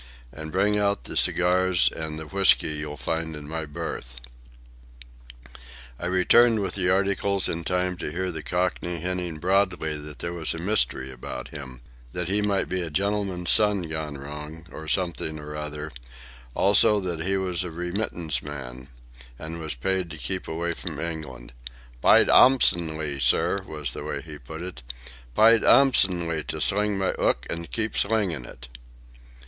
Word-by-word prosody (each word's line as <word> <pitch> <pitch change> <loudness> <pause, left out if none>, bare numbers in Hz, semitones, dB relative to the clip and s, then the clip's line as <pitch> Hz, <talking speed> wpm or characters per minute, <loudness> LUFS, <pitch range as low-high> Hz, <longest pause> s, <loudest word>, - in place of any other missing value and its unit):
"And 80 +5 -8
bring 105 +3 +2
out 100 -10 0
the - - -7
cigars 90 0 +3
and 80 -1 -4
the 80 - -6
whisky 95 +2 +4
you'll 75 -1 -4
find 80 +1 -3
in 75 -1 -9
my 80 0 -4
berth." 60 -4 -6 1.8
I 90 - -3
returned 110 +5 +4
with 95 - -3
the 90 -2 0
articles 100 +1 +1
in 85 +1 -3
time 90 +1 0
to 75 - -5
hear 90 +3 -2
the 80 -2 -6
Cockney 90 +2 -2
hinting 90 -1 -3
broadly 90 -3 +1
that 75 0 -9
there 85 0 -4
was 85 -1 -1
a - - -5
mystery 80 -8 0
about 65 -1 -7
him, 65 -5 -9 0.3
that 90 -1 -3
he 105 +2 +2
might 100 -1 +1
be 90 0 -2
a 85 - -3
gentleman's 95 0 0
son 105 -3 +3
gone 80 -3 -4
wrong 75 +3 -8
or 80 - -9
something 85 -3 -1
or 75 0 -8
other; 75 0 -5 0.6
also, 105 +2 +5
that 90 -4 -3
he 95 +3 0
was 95 -2 0
a 90 - -5
remittance 85 - -3
man 65 -3 -8 0.5
and 80 +4 -7
was 80 -4 -3
paid 95 +7 -1
to 80 - -8
keep 95 +4 -4
away 85 +1 -2
from - - -6
England—"p'yed - - 0
'ansomely, 80 - +4
sir," 100 +7 +2
was 75 -5 -4
the - - -6
way - - -4
he 75 -2 -10
put 80 +6 -8
it; 90 -9 -8 0.5
"p'yed 115 +1 +6
'ansomely 90 - +4
to - - -4
sling 105 0 +2
my 95 -1 +1
'ook - - +1
an' 85 0 -2
keep 110 -1 -3
slingin' 100 - +1
it." - - -11
85 Hz, 160 wpm, -25 LUFS, 75-95 Hz, 1.8 s, p'yed